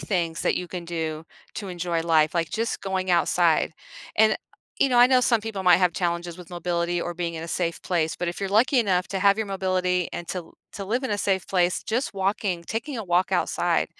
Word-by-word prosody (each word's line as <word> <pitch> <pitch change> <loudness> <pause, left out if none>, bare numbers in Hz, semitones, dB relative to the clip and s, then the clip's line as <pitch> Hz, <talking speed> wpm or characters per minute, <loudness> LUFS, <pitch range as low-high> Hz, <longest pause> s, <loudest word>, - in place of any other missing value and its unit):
things 170 -4 -1
that - - +1
you 180 - -4
can 175 -1 -6
do 160 -2 -4 0.3
to 200 - -5
enjoy 175 -2 -2
life, 160 -1 +3
like 165 -2 0
just 230 +1 -2
going 190 -1 -2
outside, 170 -2 +3 0.4
and, 215 0 +5 0.4
you 275 - +5
know, 245 -2 +3
I 245 - +9
know 255 0 +4
some 235 -2 +3
people 210 -3 -5
might 180 -2 +6
have 180 -2 +2
challenges 170 0 -2
with 180 -1 -12
mobility 175 0 -1
or 175 0 -4
being 170 -1 -3
in 160 - -5
a 165 - -8
safe 170 0 -1
place, 165 -3 0
but 175 - -3
if 175 - -5
you're 195 - -1
lucky 245 +6 +4
enough 185 -5 +1
to 190 0 -3
have 200 +1 +4
your 220 - -1
mobility 185 -2 0
and 175 - -5
to 180 -3 -5 0.2
to 200 - -6
live 240 +7 -1
in 250 - -1
a 205 - -1
safe 190 -2 0
place, 180 -2 +1
just 235 +3 -1
walking 190 -2 -1
taking 230 - -4
a 220 - -4
walk 180 0 +1
outside, - - +1
180 Hz, 225 wpm, -25 LUFS, 170-200 Hz, 0.4 s, I